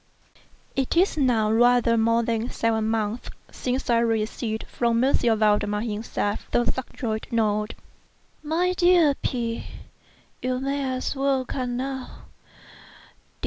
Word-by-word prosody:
It 270 +4 0
is 370 +3 +3
now 240 -7 +2
rather 240 0 +4
more 230 +1 +2
than 230 +1 -1
seven 220 -1 0
months 220 +1 -2 0.2
since 255 +1 -3
I 235 -1 +3
received, 220 0 -1
from 235 0 0
M. 270 - +3
Valdemar 210 -2 +2
himself, 210 -2 -3
the 240 - +2
subjoined 235 -3 -3
note: 215 -2 0 0.7
MY 335 +4 0
DEAR 350 -4 +4
P——, 235 -2 -2 0.8
You 255 0 -1
may 275 -1 -1
as 255 - -3
well 270 -1 +1
come 250 -1 -3
now. 265 0 -5
235 Hz, 120 wpm, -25 LUFS, 220-265 Hz, 0.8 s, rather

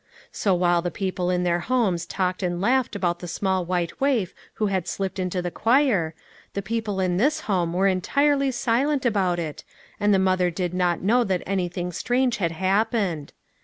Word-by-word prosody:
So 195 -3 +1
while 175 -1 +2
the 175 - -2
peo 190 +2 -3
ple 180 -1 -2
in 180 0 +1
their 175 -1 +1
homes 190 -5 0
talked 185 -1 -1
and 175 -1 -1
laughed 245 +4 +1
about 175 -3 -1
the 175 - -7
small 190 +2 0
white 175 +2 -2
waif 255 -10 +1 0.2
who 215 - 0
had 190 -4 -1
slipped 195 0 -3
into 180 0 -2
the 175 - -3
choir, 225 - +2 0.4
the 200 - -3
people 220 -1 -2
in 180 -1 +1
this 285 +9 +2
home 175 -5 0
were 190 +2 +1
entirely 275 +9 +2
silent 260 +3 0
about 195 -6 +1
it, 160 -3 -5 0.4
and 205 0 +2
the 195 - +5
mother 185 -1 +2
did 180 0 -3
not 180 -2 0
know 240 +5 +4
that 185 -2 -1
any 185 -2 -1
thing 180 0 -4
strange 245 +4 0
had 170 -5 0
happened. 190 -3 0
190 Hz, 195 wpm, -24 LUFS, 175-225 Hz, 0.4 s, the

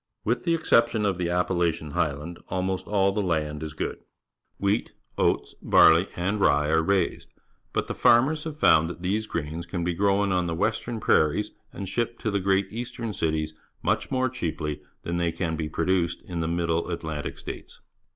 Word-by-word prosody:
With 120 +2 -1
the 170 - +3
exception 115 -8 +3
of 95 -3 0
the 85 -1 0
Appalachian 85 -3 0
Highland; 80 0 -2
almost 95 0 -2
all 100 -1 +3
the 105 +2 -1
land 80 -5 -1
is 80 -1 -5
good. 80 - -4 0.6
\\Tipf^tr 100 +3 +1 0.2
" - - -41
fits, - - +1
barley, 85 +4 +6
and 100 +4 -1
r 75 -4 +4
ye 75 - 0
are 80 0 +4
raised, 95 0 0 0.4
but - - 0
the - - -4
farmers 140 +7 +4
have 155 -2 -5
found 80 - +5
that 85 +1 -8
these 105 +4 0
grains 80 0 -4
can 85 0 -3
be 90 0 0
grown 100 +2 +2
on 90 -1 +1
the 85 - -2
western 110 +4 -1
prairies 75 -7 +2 0.2
and 100 - -6
shipped 120 +4 -2
to 110 - -1
the 100 - +1
great 95 +1 +2
eastern 115 -1 -4
cities 80 -3 -1 0.3
much - - 0
more 130 0 +1
cheaply 80 - -3 0.2
than 85 +1 -2
they 85 -1 +1
can 80 -1 -2
be 80 -1 -3
produced 85 +1 0
in 85 -2 -5
the 80 - -1
]\Iiddle 85 0 0
Atlantic 80 -4 -4
States. - - -8
90 Hz, 190 wpm, -26 LUFS, 80-105 Hz, 0.6 s, barley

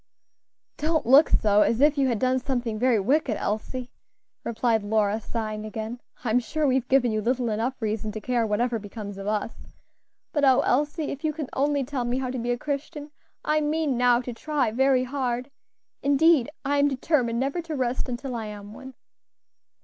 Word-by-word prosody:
"Don't 315 +1 0
look 275 +6 +7
so 210 -1 +3
as 230 - +2
if 295 +1 +5
you 275 -2 +2
had 240 -3 0
done 255 +2 +1
something 245 -4 -2
very 245 -2 +3
wicked, 255 +2 +1
Elsie," 245 +4 -3 0.5
replied 230 -1 +1
Lora, 210 +1 +1
sighing 215 -1 -4
again. 220 +3 -6 0.2
"I'm 240 0 +2
sure 300 +6 -2
we 265 - +3
have 260 -1 0
given 260 -3 +3
you 215 0 -1
little 245 +1 0
enough 230 +5 -2
reason 215 -1 -2
to 215 - -4
care 240 +2 0
whatever 230 +2 0
becomes 205 -1 -8
of 195 - -6
us; 215 +1 -1 0.8
but 290 -3 0
oh! 265 0 +5
Elsie, 295 +4 0
if 280 - -7
you 310 -1 0
can 300 -3 -5
only 285 0 +1
tell 255 -1 -3
me 240 +1 -1
how 260 -1 -2
to 255 - -3
be 240 +1 -3
a 245 - +1
Christian, 290 +2 -5 0.3
I 305 0 +2
mean 300 -2 0
now 245 0 +3
to 245 -1 -6
try 280 -1 -1
very 260 +2 +3
hard; 255 0 -3 0.5
indeed, 285 -1 +4 0.2
I 285 +1 +1
am 285 - +4
determined 260 -4 0
never 275 +6 -1
to 325 -2 -5
rest 255 -1 -1
until 250 +1 -4
I 225 -2 -4
am 205 0 -9
one." 265 +3 -11
250 Hz, 190 wpm, -25 LUFS, 225-280 Hz, 0.8 s, look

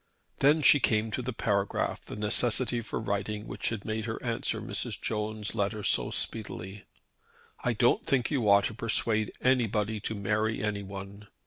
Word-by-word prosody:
Then 150 +3 +4
she 140 +2 +7
came 110 -3 +1
to 130 - -2
the 125 +1 -3
paragraph 100 -3 -1
the - - -8
necessity 120 +3 +2
for 115 - -4
writing 105 0 -3
which - - -2
had 110 -3 -5
made 110 0 -2
her 110 -1 -3
answer 115 -2 -1
Mrs. - - -3
Jones' 105 -1 -2
letter 105 -1 -1
so - - +2
speedily. 100 -2 -2 0.8
"I - - +1
don't - - +3
think 130 -1 +1
you 125 -8 +1
ought 100 0 +6
to - - -2
persuade 110 -1 +1
anybody 110 -4 +1
to 110 +2 -3
marry 110 +2 0
anyone. 100 0 -5
110 Hz, 160 wpm, -29 LUFS, 105-115 Hz, 0.8 s, she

